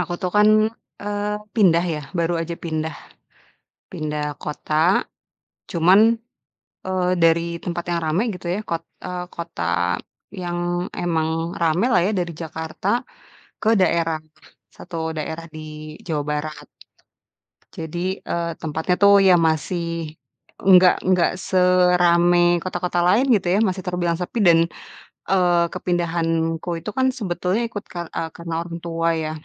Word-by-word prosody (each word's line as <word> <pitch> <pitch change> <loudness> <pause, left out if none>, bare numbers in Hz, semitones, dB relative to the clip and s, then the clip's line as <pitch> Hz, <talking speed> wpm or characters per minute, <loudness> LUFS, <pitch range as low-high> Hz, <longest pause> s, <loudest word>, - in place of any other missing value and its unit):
aku 175 0 -2
tuh 180 - 0
kan, 210 +1 +6 0.5
eee, 205 0 -2 0.3
pindah 175 -6 +4
ya, 150 - -4 0.2
baru 170 +1 +1
aja 170 +1 -3
pindah 160 -1 -2 1.0
pindah 150 -1 -3 0.2
kota. 150 +1 -5 1.0
Cuman, 180 +4 +5 0.9
eee, 185 -1 0
dari 165 0 +5 0.2
tempat 175 -1 -3
yang 170 -1 0
ramai 165 +8 +1
gitu 180 - -9
ya, - - -2
kot 165 -1 -2 0.2
eee, 180 0 -4
kota 170 0 -6 0.8
yang 175 -1 -3 0.4
emang 160 -2 0 0.3
ramailah 175 +5 +3
ya, - - +1
dari 175 -1 -1
Jakarta 160 +2 -6 0.8
ke 220 - +2
daerah, 165 -3 +2 0.6
satu 180 - -10 0.2
daerah 160 +2 -4
di 155 - -7 0.5
Jawa 155 -4 -1
Barat. 150 0 -4 1.1
Jadi, 175 +4 -4
eee, 170 0 -2
tempatnya 160 +3 -1
tuh, 200 0 +7
ya 185 - +7
masih 165 0 -2 0.4
nggak 185 -1 +6
nggak 180 -2 +3
seramai 180 -2 +4 0.2
kota-kota 180 -1 -2
lain 205 +9 +4
gitu 195 -3 -1
ya, - - +3
masih 185 -1 -3
terbilang 175 -2 -1
sepi. 180 +6 -3
Dan, 165 -1 +7 0.7
eee, 175 -2 +3
kepindahanku 165 -2 -1
itu 210 - -5
kan 260 0 +3
sebetulnya 185 +1 -1
ikut 210 -3 -6
kar 175 -1 -5
eee, 165 - -2
karena 170 -1 -5
orang 170 0 -7
tua, 165 0 -1
ya. 155 - -3
175 Hz, 130 wpm, -22 LUFS, 165-180 Hz, 1.1 s, tuh